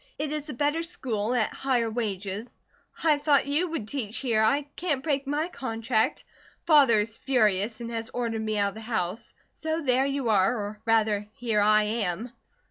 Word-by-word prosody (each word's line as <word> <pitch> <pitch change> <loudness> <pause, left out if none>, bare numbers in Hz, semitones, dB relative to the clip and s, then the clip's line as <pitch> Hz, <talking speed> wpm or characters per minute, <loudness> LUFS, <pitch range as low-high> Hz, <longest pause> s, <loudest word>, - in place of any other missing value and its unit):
It 295 0 -3
is 300 0 -4
a - - -4
better 295 +5 +1
school, 250 -10 -2
at 220 -3 +1
higher 245 -4 0
wages. 210 0 -4 0.5
I 305 -3 +4
thought 285 -1 +3
you 295 +6 +1
would 315 -10 -3
teach 225 -3 -3
here 230 -5 +1
I 275 +7 +3
can't 295 -7 -1
break 280 -3 -1
my 295 +3 0
contract. 230 -4 -1 0.4
Father 285 -8 +6
is 220 +1 -5
furious 215 -4 +1
and 235 0 -5
has 225 -1 -4
ordered 230 -2 -2
me 215 -1 -2
out 200 -1 +2
of - - -11
the 220 - -9
house. 220 -3 -3 0.2
So 320 +1 -3
there 260 0 +3
you 275 -4 -1
are, 200 +2 +3
or 210 0 -5
rather 215 -2 +2
here 225 -3 0
I 215 +1 +5
am." 215 +1 -2
235 Hz, 185 wpm, -27 LUFS, 215-280 Hz, 0.5 s, Father